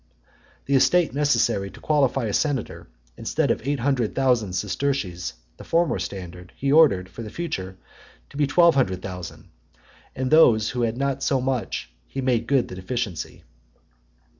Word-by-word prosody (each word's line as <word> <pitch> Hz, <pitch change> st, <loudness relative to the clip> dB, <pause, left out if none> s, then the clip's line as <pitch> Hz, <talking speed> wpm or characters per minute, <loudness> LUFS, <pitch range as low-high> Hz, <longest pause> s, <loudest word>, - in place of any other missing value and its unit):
The 140 Hz, -, -1 dB
estate 165 Hz, +3 st, +3 dB
necessary 120 Hz, -9 st, +1 dB
to -, -, -14 dB
qualify 135 Hz, -4 st, +1 dB
a 105 Hz, -, -2 dB
senator, 145 Hz, -7 st, -2 dB, 0.3 s
instead -, -, 0 dB
of -, -, -1 dB
eight 140 Hz, -3 st, -1 dB
hundred 125 Hz, -4 st, 0 dB
thousand 125 Hz, -8 st, +1 dB
sesterces, 95 Hz, -2 st, -2 dB, 0.2 s
the -, -, -11 dB
former 170 Hz, 0 st, +1 dB
standard, 90 Hz, -2 st, -7 dB
he 140 Hz, 0 st, -1 dB
ordered, 140 Hz, -, +5 dB
for 95 Hz, +5 st, -10 dB
the 110 Hz, -, -6 dB
future, 95 Hz, -, -5 dB, 0.5 s
to -, -, -16 dB
be 145 Hz, -1 st, +2 dB
twelve 170 Hz, +3 st, +5 dB
hundred 95 Hz, -9 st, 0 dB
thousand; 90 Hz, -3 st, -8 dB, 0.7 s
and 130 Hz, 0 st, -2 dB
to -, -, +7 dB
those 110 Hz, -9 st, +5 dB
who 125 Hz, -, -3 dB
had 115 Hz, 0 st, 0 dB
not 140 Hz, 0 st, -1 dB
so 135 Hz, -3 st, +1 dB
much, 125 Hz, -, -3 dB, 0.2 s
he -, -, -6 dB
made 125 Hz, -3 st, 0 dB
good 135 Hz, -3 st, +2 dB
the -, -, -9 dB
deficiency. 100 Hz, -1 st, -4 dB
125 Hz, 165 wpm, -24 LUFS, 100-140 Hz, 0.7 s, to